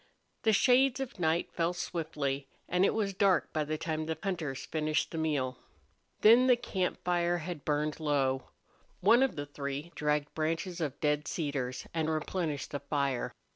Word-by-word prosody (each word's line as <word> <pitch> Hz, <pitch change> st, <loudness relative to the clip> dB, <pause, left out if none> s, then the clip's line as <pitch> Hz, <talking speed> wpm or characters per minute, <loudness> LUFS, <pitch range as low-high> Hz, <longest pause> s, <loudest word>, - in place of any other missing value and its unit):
The 220 Hz, -, +3 dB
shades 255 Hz, +4 st, +4 dB
of 265 Hz, -7 st, -5 dB
night 165 Hz, 0 st, +1 dB
fell 170 Hz, +1 st, 0 dB
swiftly, 150 Hz, -6 st, -3 dB, 0.2 s
and 180 Hz, +1 st, +2 dB
it -, -, +3 dB
was 205 Hz, -3 st, 0 dB
dark 190 Hz, -2 st, +2 dB
by 155 Hz, -, +1 dB
the 155 Hz, +1 st, -2 dB
time 155 Hz, 0 st, -3 dB
the 160 Hz, -1 st, -2 dB
hunters 165 Hz, -9 st, -3 dB
finished 155 Hz, 0 st, 0 dB
the 165 Hz, -, -3 dB
meal. 135 Hz, -5 st, -1 dB, 0.6 s
Then 235 Hz, +4 st, +7 dB
the 250 Hz, -, +7 dB
camp 190 Hz, -6 st, -2 dB
fire 175 Hz, -1 st, +1 dB
had 165 Hz, -3 st, -6 dB
burned 150 Hz, +1 st, 0 dB
low. 135 Hz, -4 st, 0 dB, 0.5 s
One 230 Hz, +6 st, +6 dB
of 270 Hz, -2 st, +2 dB
the 145 Hz, -, -4 dB
three 145 Hz, +2 st, -5 dB
dragged 150 Hz, -1 st, 0 dB
branches 165 Hz, +3 st, -2 dB
of 145 Hz, -4 st, -3 dB
dead 150 Hz, 0 st, +1 dB
cedars 135 Hz, -6 st, -3 dB
and 160 Hz, -1 st, 0 dB
replenished 155 Hz, -1 st, -2 dB
the 145 Hz, -, -2 dB
fire. 140 Hz, -3 st, -1 dB
160 Hz, 170 wpm, -31 LUFS, 145-180 Hz, 0.6 s, Then